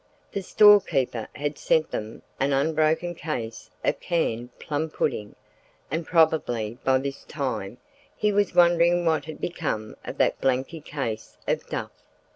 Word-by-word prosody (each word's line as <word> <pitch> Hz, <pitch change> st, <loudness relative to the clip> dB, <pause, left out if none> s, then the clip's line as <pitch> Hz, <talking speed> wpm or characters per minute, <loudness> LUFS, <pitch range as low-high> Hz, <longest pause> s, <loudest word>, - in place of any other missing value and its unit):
The 200 Hz, -, -2 dB
storekeeper 180 Hz, -, +4 dB
had 145 Hz, 0 st, -3 dB
sent 160 Hz, -1 st, +2 dB
them 110 Hz, +1 st, -5 dB, 0.2 s
an 140 Hz, +1 st, +2 dB
unbroken 155 Hz, +4 st, +1 dB
case 120 Hz, -9 st, -5 dB
of -, -, +1 dB
canned 125 Hz, -8 st, -2 dB
plum 155 Hz, +2 st, -2 dB
pudding, 105 Hz, -9 st, -2 dB, 0.6 s
and 160 Hz, +2 st, -2 dB
probably 120 Hz, -9 st, +2 dB
by 130 Hz, 0 st, +4 dB
this 135 Hz, +1 st, -4 dB
time 125 Hz, -7 st, -4 dB, 0.4 s
he 210 Hz, -, +2 dB
was 205 Hz, -2 st, +1 dB
wondering 175 Hz, 0 st, +5 dB
what 160 Hz, -2 st, +2 dB
had 155 Hz, -1 st, -8 dB
become 145 Hz, -11 st, -3 dB
of -, -, -7 dB
that -, -, +2 dB
blanky 135 Hz, +5 st, 0 dB
case 115 Hz, -8 st, -5 dB
of -, -, -1 dB
duff. -, -, -3 dB
150 Hz, 140 wpm, -25 LUFS, 125-170 Hz, 0.6 s, wondering